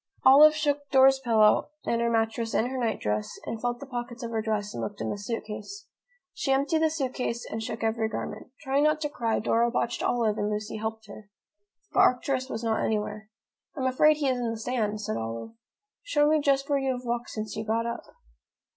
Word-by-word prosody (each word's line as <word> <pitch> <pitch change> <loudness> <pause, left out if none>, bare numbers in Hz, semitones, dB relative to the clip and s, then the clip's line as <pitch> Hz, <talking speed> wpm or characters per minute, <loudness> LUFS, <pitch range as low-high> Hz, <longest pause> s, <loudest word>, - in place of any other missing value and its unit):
Olive 295 +4 +8
shook 290 -2 -1
Dora's 265 0 +6
pillow 225 -3 +3 0.2
and 235 0 0
her 235 - +2
mattress 225 0 0
and 230 - +2
her 260 - -4
nightdress, 105 - -2
and 225 - -5
felt 240 0 -1
the 280 - -8
pockets 240 -1 -6
of 230 - -4
her 225 -1 -1
dress 210 -2 -2
and - - -5
looked 205 -1 -5
in - - -2
the - - -2
suit 225 +3 -4
case. 225 - -8 0.5
She 270 - -2
emptied 280 +4 +2
the 320 0 +3
suit 275 -5 -2
case 235 -1 -3
and 220 - -4
shook 225 +1 -5
every 220 0 0
garment. 210 -1 -5
Trying 275 +1 +1
not 305 0 +3
to 295 - -1
cry, 230 -6 -1
Dora 230 +2 +2
watched 235 0 -1
Olive 225 -3 +1
and 205 - 0
Lucy 210 +1 -3
helped 220 0 -4
her. 205 0 -12 0.6
But - - +2
Arcturus 260 +1 +2
was 225 -1 -4
not 225 -1 0
anywhere. 215 0 -2 0.5
"I - - -3
am - - 0
afraid 300 +4 +4
he 290 -2 0
is 255 -1 +1
in 240 -1 -1
the 225 - -3
sand," 220 -2 -2
said 110 - -3
Olive. 115 - -5 0.5
"Show 295 -12 +2
me 310 0 +3
just 275 -1 +2
where 285 -1 +2
you 270 -1 0
have 250 0 -7
walked 240 0 -2
since 215 -1 -5
you 220 - -3
got 225 +1 0
up." 235 0 -3
235 Hz, 220 wpm, -27 LUFS, 220-270 Hz, 0.6 s, Olive